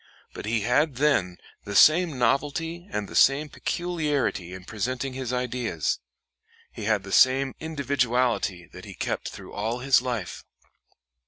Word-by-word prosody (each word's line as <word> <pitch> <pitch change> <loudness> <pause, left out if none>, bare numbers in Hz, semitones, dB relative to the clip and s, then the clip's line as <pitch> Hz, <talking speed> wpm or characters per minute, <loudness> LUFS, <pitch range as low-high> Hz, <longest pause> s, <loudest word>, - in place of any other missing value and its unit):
But - - -7
he 110 0 0
had 135 +6 +2
then 120 -11 +1 0.3
the 100 - -6
same 155 - +5
novelty 150 - 0
and 105 -1 -3
the - - -10
same 145 +3 +4
peculiarity 150 - -2
in 90 0 -9
presenting 130 +5 -3
his 130 -2 -4
ideas. 125 -9 -1 0.7
He 105 - -7
had 105 -2 +1
the 100 - -9
same 130 +4 +4
individuality 125 - 0
that - - -10
he - - -10
kept - - -3
through - - -11
all 110 +4 -2
his 135 +1 +3
life." 120 -8 -4
125 Hz, 145 wpm, -26 LUFS, 110-145 Hz, 0.7 s, same